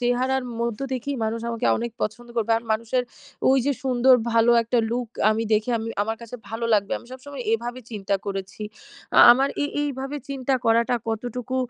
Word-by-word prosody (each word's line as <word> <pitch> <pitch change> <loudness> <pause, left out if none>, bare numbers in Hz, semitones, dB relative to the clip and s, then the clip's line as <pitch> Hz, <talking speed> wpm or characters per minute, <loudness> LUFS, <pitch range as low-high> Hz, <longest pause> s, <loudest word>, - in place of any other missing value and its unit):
চেহারার 250 +2 +1 0.2
মধ্যে 235 +3 -2
দেখেই 265 +2 -3
মানুষ 225 +1 -2
আমাকে 230 -1 -2
অনেক 235 0 -3
পছন্দ 240 +3 -4
করবে। 230 0 +1
আর 230 - -14
মানুষের 230 +3 0 0.5
ওইযে, 270 +1 +3
সুন্দর 255 0 +5 0.2
ভালো 230 +1 +4
একটা 235 +1 0
লুক 245 0 -1 0.2
আমি 220 +1 0
দেখে 215 +3 +2
আমি 225 - -4
আমার 225 +1 -2
কাছে 235 +2 -8
ভালো 225 +2 -4
লাগবে। 200 -1 0
আমি - - -17
সবসময় 260 0 -8
এভাবে 240 +2 -2
চিন্তা 200 -2 -2
করেছি। 195 +1 -5 0.5
আ - - +8
আমার 265 +3 +2
এ - - +2 0.2
এইভাবে 275 0 -3
চিন্তা 270 -1 -1
করাটা 230 +2 +3
কতটুকু 245 +3 -3
240 Hz, 175 wpm, -24 LUFS, 225-260 Hz, 0.5 s, আ